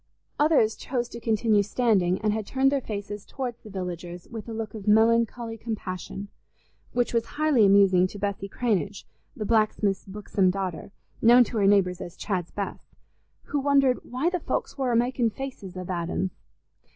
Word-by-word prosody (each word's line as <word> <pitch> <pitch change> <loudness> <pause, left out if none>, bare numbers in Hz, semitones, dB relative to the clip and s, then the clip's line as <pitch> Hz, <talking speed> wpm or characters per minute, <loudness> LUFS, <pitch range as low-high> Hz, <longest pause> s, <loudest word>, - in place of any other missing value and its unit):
Others 290 -8 +3
chose 245 -2 -2
to 235 - -8
continue 220 -2 +2
standing, 200 -4 +1
and 215 -1 +1
had 215 -2 -3
turned 270 +1 +2
their 280 -1 +1
faces 205 -2 -5
towards 250 -3 -5
the 215 - -12
villagers 180 -2 -6
with 225 -1 -8
a - - -5
look 220 -1 -5
of 215 -2 -8
melancholy 225 +1 +3
compassion, 200 -3 -5 0.6
which 245 -1 0
was 230 0 +1
highly 295 -9 +4
amusing 195 -2 +5
to 205 - -10
Bessy 200 -1 -3
Cranage, 205 -3 -1 0.3
the 215 - -3
blacksmith's 215 -3 +1
buxom 195 -1 0
daughter, 185 -1 -3 0.3
known 240 +2 +7
to 235 - -5
her 200 -2 +3
neighbours 185 -3 +3
as 175 - -8
Chad's 180 -5 -2
Bess, 200 -1 -6 0.5
who 290 - -2
wondered 275 -2 +3
"why 265 +8 -1
the 360 - -1
folks - - -3
war 265 -3 0
amakin' 240 0 +2
faces 210 -8 -7
a 185 - -4
that'ns." 180 +1 -2
215 Hz, 165 wpm, -26 LUFS, 195-240 Hz, 0.6 s, known